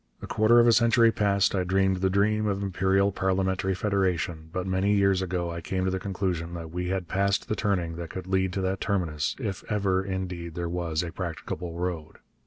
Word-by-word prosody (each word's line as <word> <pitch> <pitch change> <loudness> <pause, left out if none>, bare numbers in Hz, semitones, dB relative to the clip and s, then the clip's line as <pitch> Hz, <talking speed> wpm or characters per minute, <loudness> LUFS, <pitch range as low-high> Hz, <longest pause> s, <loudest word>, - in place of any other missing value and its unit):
A - - -7
quarter 110 +2 +4
of 120 - +6
a 120 - +6
century 115 0 +5
past 100 -2 +2
I 95 -2 +1
dreamed 95 +1 +2
the 95 +1 +1
dream 105 +2 +2
of 100 -1 -1
imperial 95 +1 +2
parliamentary 95 0 0
federation, 90 -5 -1
but 90 +1 -3
many 95 +2 +1
years 100 -2 +3
ago 90 -2 -2
I 85 0 -5
came 95 +3 -2
to 95 - +1
the 95 - -1
conclusion 90 -3 -3
that 80 -2 -7
we 90 +1 -3
had 95 -1 -2
passed 100 +2 0
the 110 - -1
turning 90 -5 -1
that 85 -1 -6
could 95 +2 -6
lead 95 0 +1
to 95 - -2
that 95 +1 -1
terminus, 85 -8 -1
if 100 -7 -4
ever, 95 -2 +1
indeed, 90 -3 -4
there 85 -1 -2
was 85 -2 -1
a 85 - -5
practicable 85 -1 -5
road. 85 -3 -4
95 Hz, 205 wpm, -27 LUFS, 90-100 Hz, -, of